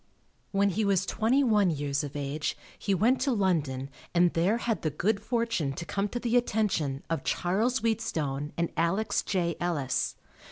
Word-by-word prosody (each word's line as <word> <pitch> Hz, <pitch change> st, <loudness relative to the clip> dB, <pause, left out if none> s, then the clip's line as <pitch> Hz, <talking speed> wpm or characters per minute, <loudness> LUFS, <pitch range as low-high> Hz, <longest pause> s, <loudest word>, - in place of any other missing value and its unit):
When 200 Hz, 0 st, +2 dB
he 215 Hz, +4 st, 0 dB
was 195 Hz, -2 st, +2 dB
twenty 240 Hz, +8 st, +2 dB
one 210 Hz, -6 st, +4 dB
years 145 Hz, -2 st, -1 dB
of 145 Hz, -1 st, -6 dB
age 145 Hz, +1 st, -2 dB, 0.2 s
he 200 Hz, -, +1 dB
went 235 Hz, +8 st, +3 dB
to 275 Hz, -, +2 dB
London 150 Hz, -, 0 dB, 0.2 s
and 175 Hz, 0 st, +4 dB
there 185 Hz, +7 st, +2 dB
had 230 Hz, -2 st, -1 dB
the 155 Hz, -, 0 dB
good 200 Hz, +8 st, 0 dB
fortune 230 Hz, -, 0 dB
to 170 Hz, -, -6 dB
come 200 Hz, +4 st, -1 dB
to 240 Hz, -, -3 dB
the 240 Hz, 0 st, 0 dB
attention 195 Hz, -, 0 dB
of 165 Hz, -, -2 dB
Charles 220 Hz, +9 st, +1 dB
Wheatstone 155 Hz, -11 st, -1 dB
and 170 Hz, 0 st, 0 dB
Alex 175 Hz, +6 st, +1 dB
J. 175 Hz, -3 st, -1 dB
Ellis. 150 Hz, -8 st, -1 dB
185 Hz, 170 wpm, -28 LUFS, 150-220 Hz, 0.2 s, one